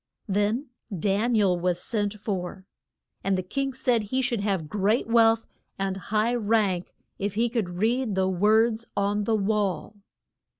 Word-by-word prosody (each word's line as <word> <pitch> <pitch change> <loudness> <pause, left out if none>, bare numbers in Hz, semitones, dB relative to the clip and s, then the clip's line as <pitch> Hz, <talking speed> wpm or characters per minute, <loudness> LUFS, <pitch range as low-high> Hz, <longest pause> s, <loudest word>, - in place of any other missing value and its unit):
Then 210 +7 0 0.3
Dan 205 +7 +1
i - - +4
el 180 -3 +2
was 175 0 0
sent 205 0 -2
for, 190 -2 -4 0.6
and 195 0 +1
the 185 - -2
king 275 +8 -2
said 250 -3 +1
he 260 +5 -1
should 240 -4 0
have 195 -6 -1
great 205 +7 +1
wealth 230 -1 +4 0.3
and 195 -1 -1
high 215 +4 0
rank 210 -6 0 0.2
if 200 0 -2
he 235 +2 +2
could 225 -6 -1
read 225 +1 +1
the 190 0 +2
words 220 +5 +2
on 205 +1 +1
the 225 - +2
wall. 210 -1 -1
210 Hz, 160 wpm, -26 LUFS, 195-230 Hz, 0.6 s, i